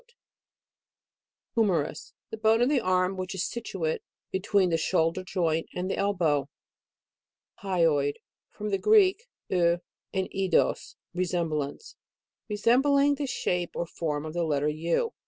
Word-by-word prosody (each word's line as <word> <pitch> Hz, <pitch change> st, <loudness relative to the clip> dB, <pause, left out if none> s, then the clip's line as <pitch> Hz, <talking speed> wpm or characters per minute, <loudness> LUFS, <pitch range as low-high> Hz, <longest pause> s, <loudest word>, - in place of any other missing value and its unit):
it. 475 Hz, -, -29 dB, 1.4 s
HUMERUS. 180 Hz, -, 0 dB, 0.2 s
The 220 Hz, -, -6 dB
hone 220 Hz, +1 st, +4 dB
of 250 Hz, -, +3 dB
the 285 Hz, -4 st, +2 dB
arm, 185 Hz, 0 st, +1 dB
which 185 Hz, +1 st, -4 dB
is 190 Hz, -, -1 dB
situate 190 Hz, -9 st, -3 dB, 0.3 s
between 190 Hz, -1 st, +2 dB
the 165 Hz, -, +3 dB
shoul 165 Hz, 0 st, +2 dB
der 185 Hz, -, -5 dB
joint 170 Hz, -4 st, -1 dB
and 185 Hz, +1 st, -2 dB
the -, -, 0 dB
elbow. 165 Hz, -8 st, +1 dB, 1.1 s
HYOID. 165 Hz, -7 st, +2 dB, 0.3 s
From 210 Hz, 0 st, -5 dB
the 195 Hz, -, +1 dB
Greek, 425 Hz, -, +4 dB, 0.2 s
u, 170 Hz, -1 st, +2 dB, 0.3 s
and 190 Hz, -1 st, -1 dB
eidos, 190 Hz, -3 st, +1 dB, 0.2 s
lesemblance. 170 Hz, -, -2 dB, 0.6 s
Resembling 270 Hz, +7 st, +3 dB
the 285 Hz, 0 st, -3 dB
shape 180 Hz, -8 st, -2 dB
or 170 Hz, -, -1 dB
form 155 Hz, -3 st, -3 dB
of 155 Hz, -, -6 dB
the 175 Hz, 0 st, 0 dB
letter 150 Hz, -2 st, +1 dB
U. 165 Hz, -, -1 dB
185 Hz, 135 wpm, -27 LUFS, 165-210 Hz, 1.4 s, hone